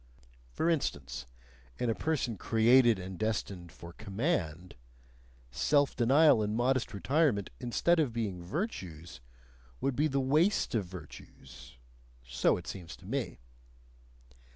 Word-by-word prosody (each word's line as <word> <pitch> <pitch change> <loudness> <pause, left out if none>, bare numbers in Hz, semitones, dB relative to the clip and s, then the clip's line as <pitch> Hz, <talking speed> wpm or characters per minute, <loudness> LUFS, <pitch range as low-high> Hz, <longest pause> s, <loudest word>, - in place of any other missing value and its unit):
For 110 - -1
instance, 70 - -2 0.5
in 125 - -1
a - - +1
person 140 -5 -1
created 115 +3 +4
and 95 -1 -7
destined 100 -5 -3
for 85 0 -11
command, 95 - -2 0.8
self 145 - +2
denial 140 +1 +5
and 105 0 -1
modest 130 0 +1
retirement, 130 -1 +1
instead 150 +7 +1
of 145 -6 +2
being 105 -6 -3
virtues, 85 - -5 0.6
would 135 - -1
be 150 +4 +2
the 140 -2 0
waste 155 +9 +2
of 110 -5 0
virtues: 75 -7 -12 0.5
so 60 - +2
it - - -9
seems 90 -4 -7
to - - -18
me. - - -3
115 Hz, 125 wpm, -31 LUFS, 90-140 Hz, 0.8 s, denial